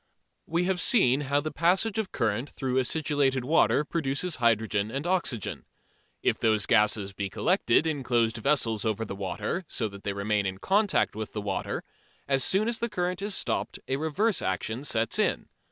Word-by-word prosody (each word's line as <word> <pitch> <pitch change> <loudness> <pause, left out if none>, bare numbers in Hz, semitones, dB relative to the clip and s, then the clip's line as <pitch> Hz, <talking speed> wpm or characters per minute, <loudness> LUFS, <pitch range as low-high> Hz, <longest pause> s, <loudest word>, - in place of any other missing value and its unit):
We 170 +2 0
have 185 0 0
seen 145 - +4
how 145 +1 +2
the 155 +1 -4
passage 190 +7 +1
of 210 -3 -3
current 115 +3 -1
through 130 -1 -1
acidulated 135 -2 +1
water 150 0 +3
produces 160 +2 -2
hydrogen 110 -3 +1
and 135 +6 -4
oxygen. 170 - -1 0.6
If - - +1
those 110 -3 +2
gases 105 -3 +2
be 100 0 -4
collected 165 - +2
in 155 -3 -1
closed 120 -2 +1
vessels 115 -3 +1
over 110 0 -1
the 100 - -6
water, 105 - -3
so 115 - -2
that 100 0 -12
they 100 - -2
remain 100 0 0
in 95 0 -4
contact 200 - +1
with 110 0 -6
the 105 - -3
water, 100 -2 -3 0.4
as 135 -2 +2
soon 200 - +3
as 235 -1 0
the 235 - -1
current 180 -1 -2
is 205 0 -1
stopped - - -2
a 135 - 0
reverse 160 +9 0
action 110 +7 -2
sets 115 -5 0
in. - - 0
130 Hz, 180 wpm, -27 LUFS, 110-170 Hz, 0.6 s, seen